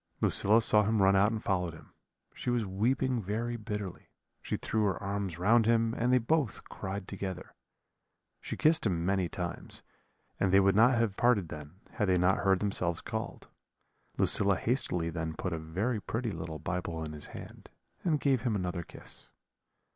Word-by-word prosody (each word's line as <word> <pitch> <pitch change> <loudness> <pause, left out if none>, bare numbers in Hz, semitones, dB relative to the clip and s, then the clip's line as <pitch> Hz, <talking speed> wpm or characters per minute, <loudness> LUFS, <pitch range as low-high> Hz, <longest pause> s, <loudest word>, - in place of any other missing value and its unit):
"Lucilla 110 +3 +5
saw 110 -1 +4
him 110 +1 +1
run 95 0 +5
out 100 +3 +4
and 110 -2 -4
followed 90 -4 -1
him; - - -16 0.4
she - - -4
was 120 -3 +1
weeping 120 +6 0
very 115 +5 -2
bitterly; 105 -4 -6 0.3
she - - -3
threw 110 -1 -1
her 95 -4 +1
arms 100 -3 -3
round 110 +5 +4
him, 115 -1 +3
and 120 +2 0
they 125 - +6
both 130 +1 0
cried 95 0 -5
together. 95 -2 -6 0.9
She - - -5
kissed 155 -6 +4
him 85 -3 -1
many 95 -2 +1
times, 90 -1 -6 0.6
and 95 - +2
they 95 - +6
would 95 0 +4
not 120 +3 +5
have 115 -4 +1
parted 110 -8 +3
then, 75 +5 -10
had 105 -5 -1
they 90 -1 +3
not 90 +2 +3
heard 95 -2 +2
themselves 90 -4 0
called. - - -5 0.7
Lucilla 100 -1 +3
hastily 90 -9 -1
then 80 -1 -4
put 90 +2 -3
a 80 - -3
very 100 +9 -2
pretty 115 +2 -3
little 80 -2 -5
Bible 85 0 -3
in 75 -1 -6
his 75 - -9
hand, - - -11 0.3
and 155 -5 +1
gave 135 -4 +2
him 120 -4 0
another 90 -2 -2
kiss. - - -10
100 Hz, 175 wpm, -30 LUFS, 90-115 Hz, 0.9 s, they